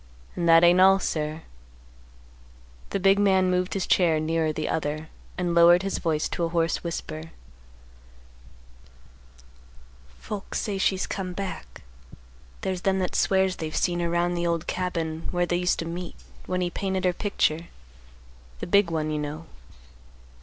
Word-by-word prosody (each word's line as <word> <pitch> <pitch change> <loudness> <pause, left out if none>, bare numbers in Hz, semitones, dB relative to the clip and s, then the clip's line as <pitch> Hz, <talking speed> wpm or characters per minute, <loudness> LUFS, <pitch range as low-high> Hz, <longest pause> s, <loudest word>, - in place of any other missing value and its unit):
"And 170 -1 0
that 165 +1 +7
ain't 175 +1 +6
all, 190 +1 +7
sir." 155 -3 -3 1.5
The - - -2
big 195 +1 +4
man 190 -2 +3
moved 180 +1 0
his 190 - -1
chair 165 -4 +3
nearer 160 0 0
the 155 0 -3
other, 155 0 -3 0.3
and 175 -2 -1
lowered 170 +2 +6
his 195 - -2
voice 155 -3 0
to 170 - -3
a 165 - 0
hoarse 165 0 0
whisper; 160 -2 -5 2.9
"Folks 200 - -5
say 200 -2 -3
she's 190 0 +1
come 185 -2 -4
back. 185 - -7 0.8
There's 185 -1 -3
them 190 0 +1
that 185 -1 -2
swears 190 -1 +2
they've 155 -1 -5
seen 175 -1 0
her 170 -1 -1
'round 175 +1 0
the 170 0 -1
old 170 -1 -1
cabin 165 -3 -3
where 175 -1 0
they 175 0 0
used 180 0 +1
to 165 - -3
meet 170 +1 -6 0.3
when 185 0 -1
he 175 -1 -1
painted 190 -1 -2
her 180 - +3
picture, 170 -4 -1 0.9
the - - -4
big 200 0 +3
one, 155 -2 -2
you 150 - -1
know. 150 +2 -5
175 Hz, 155 wpm, -25 LUFS, 165-185 Hz, 2.9 s, that